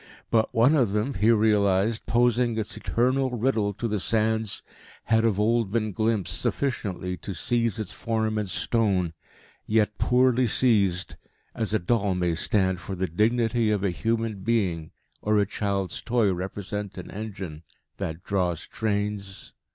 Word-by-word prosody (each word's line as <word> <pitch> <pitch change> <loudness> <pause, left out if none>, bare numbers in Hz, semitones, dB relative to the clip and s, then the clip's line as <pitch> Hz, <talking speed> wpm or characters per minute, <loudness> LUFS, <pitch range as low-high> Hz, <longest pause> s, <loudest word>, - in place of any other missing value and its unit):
But, 110 -1 +2
one 120 +6 +4
of 125 -10 +2
them, 105 +6 0
he 105 0 +2
realised, 105 -1 +2
posing 120 0 +2
its 110 -2 -2
eternal 130 +3 +1
riddle 115 -4 0
to 120 - -2
the 105 -2 -1
sands, 110 +1 0 0.4
had 110 0 +2
of 110 -3 +1
old 115 -1 +2
been 110 -1 0
glimpsed 110 -2 +1
sufficiently 95 -9 -2
to 95 +3 -6
seize 115 -3 0
its 105 -2 -4
form 110 -1 -1
in 105 - -2
stone, 95 -5 0 0.5
yet 105 -1 +1
poorly 125 +2 +3
seized, 100 -7 +1 0.4
as 110 -2 -1
a 110 - +3
doll 100 0 0
may 90 -2 0
stand 95 +2 +1
for 95 +3 -6
the 95 +1 -1
dignity 115 +5 +1
of 105 -2 0
a 100 - +1
human 115 +2 -1
being 95 -7 0 0.3
or 105 0 +2
a 100 - +3
child's 100 -2 -2
toy 115 -5 +2
represent 100 +2 -5
an 90 - -8
engine 95 -7 -6 0.4
that 80 +3 -5
draws 90 -5 -1
trains.... 105 -2 -3
105 Hz, 150 wpm, -26 LUFS, 95-115 Hz, 0.5 s, one